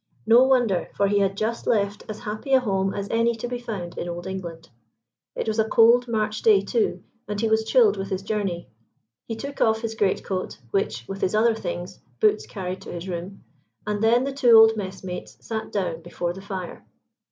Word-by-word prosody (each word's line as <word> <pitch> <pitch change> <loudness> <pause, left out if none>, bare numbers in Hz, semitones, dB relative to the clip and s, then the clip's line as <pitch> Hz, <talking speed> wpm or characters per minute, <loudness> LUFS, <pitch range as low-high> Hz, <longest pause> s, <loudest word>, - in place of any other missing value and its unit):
No 230 +3 +7
wonder, 245 -8 +2
for 200 - +2
he 205 +1 +2
had 195 0 0
just 225 +2 -2
left 205 -2 0
as 215 - -6
happy 215 +4 -4
a 265 - +7
home 195 -5 0
as 200 0 -4
any 230 +1 +2
to 230 +2 -5
be 245 0 -4
found 205 -8 -6
in 175 - -4
Old 175 0 -6
England. 170 -4 -6 0.7
It - - -3
was 220 0 -1
a 220 0 +2
cold 235 +2 +5
March 215 -2 -1
day 210 -3 +5
too, 220 +2 -1 0.2
and 205 0 -3
he 225 - +1
was 220 0 +2
chilled 455 - +4
with 195 0 -4
his 190 -1 -3
journey. 195 -4 -2 0.6
He 225 - -3
took 280 +5 -7
off 220 0 +3
his 225 -1 -3
great 205 -3 0
coat, 185 -1 -4
which, 120 -11 -1
with 195 0 -6
his 190 - +1
other 225 +2 +4
things, 180 -2 -6 0.2
Boots 215 0 +2
carried 185 -1 -5
to - - -9
his 175 +1 -6
room, 180 +2 -6 0.4
and 210 0 -2
then 235 +3 +4
the 275 0 -3
two 245 -4 +6
old 225 0 +7
messmates 190 -3 -6
sat 220 -1 -4
down 175 -5 -2
before 175 +1 -4
the 190 - -10
fire. 190 -3 -6
210 Hz, 210 wpm, -24 LUFS, 190-225 Hz, 0.7 s, No